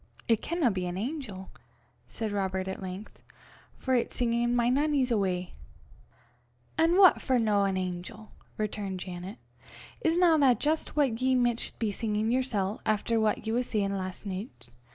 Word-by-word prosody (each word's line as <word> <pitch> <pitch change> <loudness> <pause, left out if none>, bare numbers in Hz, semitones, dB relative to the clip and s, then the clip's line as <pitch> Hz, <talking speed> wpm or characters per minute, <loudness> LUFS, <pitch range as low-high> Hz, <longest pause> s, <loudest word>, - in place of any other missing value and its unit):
"It 225 -2 +3
canna 330 -8 +1
be 185 -2 -2
an 175 +1 -4
angel," 215 -5 -5 0.6
said 220 - -4
Robert 190 -2 -1
at 190 - -5
length, 190 +3 -8 0.6
"for 260 - -1
it's 245 - 0
singin' 240 0 +1
'My 240 -1 +2
Nannie's 275 0 +2
Awa.'" 185 -4 0 1.2
"An' 330 +3 +3
what 375 -4 +7
for 260 - +2
no 210 -3 +2
an 190 -1 0
angel?" 185 +4 -5 0.3
returned 205 -3 -3
Janet. 180 +4 -7 0.7
"Isna 330 -1 +4
that 255 -6 +4
jist 310 +1 -1
what 260 -6 +1
ye 260 0 +3
micht 240 -2 0
be 220 -3 -1
singin' 215 +1 -1
yersel', 225 -6 -1
efter 220 +2 +1
what 215 0 0
ye 220 - -1
was 245 +1 0
sayin' 200 -2 0
last 185 +1 -5
nicht? 190 - -7
220 Hz, 155 wpm, -29 LUFS, 195-255 Hz, 1.2 s, what